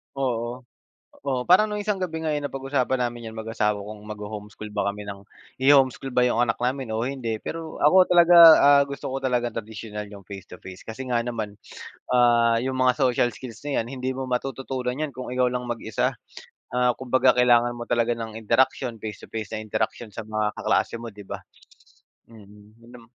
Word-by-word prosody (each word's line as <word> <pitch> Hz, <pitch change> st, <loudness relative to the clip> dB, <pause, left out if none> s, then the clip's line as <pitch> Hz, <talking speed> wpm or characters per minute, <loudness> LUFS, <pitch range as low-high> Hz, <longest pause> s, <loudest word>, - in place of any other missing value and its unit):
Oo. 125 Hz, -2 st, -2 dB, 0.6 s
Oh, 130 Hz, -3 st, 0 dB
parang 185 Hz, +4 st, +6 dB
noong 210 Hz, 0 st, -3 dB
isang 205 Hz, -1 st, -1 dB
gabi 170 Hz, -4 st, -4 dB
nga, 155 Hz, -1 st, -1 dB
eh, 150 Hz, -, 0 dB
napag-usapan 135 Hz, -2 st, -1 dB
namin 120 Hz, -1 st, -3 dB
'yan 110 Hz, -, -11 dB
mag-asawa 110 Hz, -2 st, -1 dB
kung 105 Hz, +2 st, -8 dB
magho-homeschool 105 Hz, +1 st, -8 dB
ba 105 Hz, -1 st, -2 dB
kami 105 Hz, +1 st, -7 dB
ng 100 Hz, 0 st, -9 dB, 0.3 s
iho-homeschool 135 Hz, -1 st, +3 dB
ba 125 Hz, -, +3 dB
'yong 125 Hz, -2 st, +2 dB
anak 115 Hz, -2 st, +1 dB
namin 125 Hz, -2 st, -2 dB
o 110 Hz, -, -1 dB
hindi, 120 Hz, -4 st, -3 dB
pero 165 Hz, -1 st, -6 dB
ako 185 Hz, +5 st, +6 dB
talaga, 175 Hz, -1 st, +5 dB, 0.3 s
ah, 140 Hz, 0 st, +6 dB
gusto 140 Hz, -1 st, -6 dB
ko 130 Hz, -, -3 dB
talagang 125 Hz, -3 st, -1 dB
tradisyonal, 105 Hz, -1 st, -6 dB
'yong 100 Hz, -1 st, -12 dB
face-to-face. 95 Hz, -1 st, -11 dB
Kasi 125 Hz, +3 st, -7 dB
nga 120 Hz, -1 st, +2 dB
naman, 110 Hz, -4 st, -4 dB, 0.5 s
ah, 120 Hz, -2 st, +4 dB
'yong 130 Hz, +1 st, -2 dB
mga 130 Hz, -1 st, +3 dB
social 125 Hz, -3 st, +2 dB
skills 120 Hz, -3 st, -9 dB
na 140 Hz, -, +1 dB
'yan, 115 Hz, -, -4 dB
hindi 130 Hz, 0 st, -2 dB
mo 130 Hz, -, -3 dB
matututunan 130 Hz, 0 st, -3 dB
'yan 150 Hz, -1 st, -3 dB
kung 130 Hz, +1 st, -7 dB
ikaw 125 Hz, 0 st, +1 dB
lang 125 Hz, -1 st, -3 dB
mag-isa. 115 Hz, -3 st, -2 dB, 0.6 s
Ah, 125 Hz, 0 st, +3 dB
kumbaga, 130 Hz, 0 st, +3 dB
kailangan 120 Hz, -1 st, +4 dB
mo 120 Hz, 0 st, -7 dB
talaga 120 Hz, 0 st, +1 dB
ng 115 Hz, -1 st, -7 dB
interaksiyon, 115 Hz, +1 st, 0 dB
face-to-face 110 Hz, 0 st, -6 dB
na 110 Hz, -, -5 dB
interaksiyon 110 Hz, +1 st, -3 dB
sa 110 Hz, +1 st, -8 dB
mga 110 Hz, -1 st, -1 dB
kaklase 115 Hz, -, 0 dB
mo, 115 Hz, -, -7 dB
'di 105 Hz, -2 st, -11 dB
ba? -, -, -7 dB, 0.9 s
Mm, 105 Hz, -1 st, -16 dB
yun 115 Hz, -, -16 dB
nam 120 Hz, -1 st, -14 dB
120 Hz, 185 wpm, -24 LUFS, 110-130 Hz, 0.9 s, parang